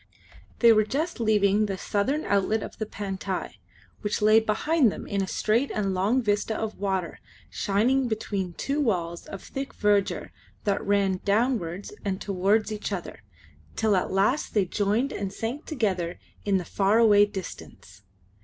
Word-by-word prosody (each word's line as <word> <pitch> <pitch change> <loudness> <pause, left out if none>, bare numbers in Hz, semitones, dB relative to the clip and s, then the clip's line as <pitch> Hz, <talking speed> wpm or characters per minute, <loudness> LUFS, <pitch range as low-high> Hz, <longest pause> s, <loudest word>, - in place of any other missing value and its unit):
They 235 -1 +8
were 215 0 +4
just 290 +8 -2
leaving 210 -2 +3
the 195 -1 -3
southern 260 +12 -1
outlet 205 +2 +1
of - - -9
the 220 - -2
Pantai, 195 -2 -4 0.4
which 210 -1 -2
lay 215 +1 +6
behind 240 +4 +2
them - - -7
in 200 -1 -1
a 190 - -2
straight 230 +8 +1
and 195 -2 -1
long 210 +8 +1
vista 210 +1 0
of 220 -1 -4
water 190 -3 -2 0.3
shining 245 +7 +1
between 200 -5 -3
two 280 - -2
walls 175 -9 -1
of 195 - -8
thick 275 0 -6
verdure 205 -1 +1 0.3
that 200 -1 0
ran 195 -2 +1
downwards 205 -4 0
and 195 -2 -2
towards 205 +3 +1
each 210 0 -4
other, 180 - -5 0.5
till 215 -2 +2
at 185 - 0
last 205 +11 +1
they 205 -3 +3
joined 210 +8 0
and 195 -1 -4
sank 230 +9 -5
together 190 - -1 0.3
in 200 -2 +3
the 180 - -4
far 200 +5 +2
away 205 -3 +6
distance. 180 - -9
205 Hz, 160 wpm, -26 LUFS, 195-225 Hz, 0.5 s, They